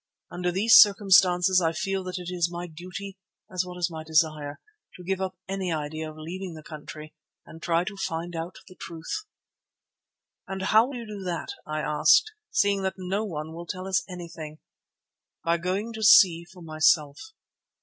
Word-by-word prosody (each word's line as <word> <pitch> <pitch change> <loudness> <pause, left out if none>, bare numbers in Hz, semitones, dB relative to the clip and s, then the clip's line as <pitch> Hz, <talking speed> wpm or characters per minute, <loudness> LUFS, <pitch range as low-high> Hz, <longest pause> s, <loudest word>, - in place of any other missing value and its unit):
Under 180 0 -2
these 215 +5 +6
circumstances 190 -3 +5
I 165 -1 +1
feel 195 +3 -2
that 185 0 -4
it 180 0 -6
is 175 -1 +1
my 175 0 -5
duty, 185 +4 -9 0.3
as 185 0 +1
well 180 0 -9
as 175 -1 -1
my 160 -1 -6
desire, 155 -2 0 0.4
to 180 - -11
give 190 +1 -2
up 185 -1 -3
any 190 -2 -2
idea 155 0 -3
of 155 - -12
leaving 175 +3 -6
the 155 - -11
country 155 0 -10 0.3
and 165 - -13
try 170 +1 +1
to 200 +2 -6
find 170 -2 -4
out 165 +2 -5
the 185 - -13
truth." 170 - -6 1.2
"And 190 0 -5
how 220 +4 +5
will 275 - -7
you 235 -1 -6
do 210 -2 -8
that," 175 - -3 0.2
I 155 0 -2
asked, 420 - +4 0.2
"seeing 200 -1 +2
that 190 0 -2
no 190 +3 -2
one 160 -4 -5
will 170 +1 -8
tell 185 +2 -5
us 190 -2 +1
anything?" 165 -4 -8 0.9
"By 170 +1 +1
going 195 +6 -2
to 220 - -7
see 175 -5 +7
for 180 0 -15
myself." 155 -2 +2
180 Hz, 180 wpm, -26 LUFS, 160-190 Hz, 1.2 s, see